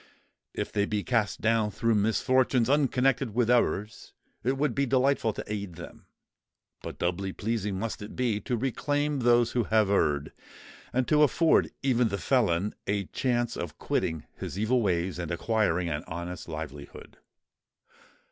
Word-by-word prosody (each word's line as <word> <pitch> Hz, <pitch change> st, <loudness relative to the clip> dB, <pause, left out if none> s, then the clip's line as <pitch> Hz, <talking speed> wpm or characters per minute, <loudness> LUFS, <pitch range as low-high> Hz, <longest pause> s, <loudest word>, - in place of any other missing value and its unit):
If -, -, -3 dB
they 100 Hz, 0 st, 0 dB
be 105 Hz, -2 st, -1 dB
cast 110 Hz, -8 st, 0 dB
down 115 Hz, -1 st, +2 dB
through 115 Hz, +2 st, 0 dB
misfortunes 125 Hz, +4 st, +2 dB
unconnected 135 Hz, -4 st, +2 dB
with 120 Hz, -1 st, +2 dB
errors, 110 Hz, -3 st, 0 dB, 0.3 s
it 130 Hz, +3 st, 0 dB
would 140 Hz, -2 st, +1 dB
be 140 Hz, +2 st, 0 dB
delightful 130 Hz, -2 st, +2 dB
to -, -, -5 dB
aid 100 Hz, -4 st, -5 dB
them: 85 Hz, 0 st, -11 dB, 0.7 s
but -, -, -7 dB
doubly 90 Hz, +2 st, -1 dB
pleasing 105 Hz, -3 st, -2 dB
must 115 Hz, +2 st, -4 dB
it 105 Hz, -, -8 dB
be 120 Hz, -5 st, 0 dB
to 120 Hz, +2 st, -2 dB
reclaim 145 Hz, +4 st, -1 dB
those 120 Hz, -1 st, +3 dB
who 120 Hz, -3 st, 0 dB
have 110 Hz, -2 st, +2 dB
erred, 75 Hz, -7 st, +1 dB, 0.6 s
and 130 Hz, 0 st, 0 dB
to 150 Hz, 0 st, +4 dB
afford 160 Hz, +3 st, +4 dB
even 125 Hz, -3 st, +3 dB
the 100 Hz, -2 st, -2 dB
felon 100 Hz, -3 st, +1 dB
a 100 Hz, 0 st, 0 dB
chance 120 Hz, -2 st, 0 dB
of 85 Hz, -3 st, -6 dB
quitting 80 Hz, -2 st, -2 dB
his -, -, -6 dB
evil 115 Hz, +4 st, +2 dB
ways 90 Hz, -3 st, 0 dB
and 85 Hz, -2 st, -4 dB
acquiring 90 Hz, -1 st, 0 dB
an 75 Hz, -2 st, -3 dB
honest 85 Hz, +2 st, -6 dB
livelihood." 75 Hz, -3 st, -8 dB
110 Hz, 155 wpm, -28 LUFS, 95-125 Hz, 0.7 s, to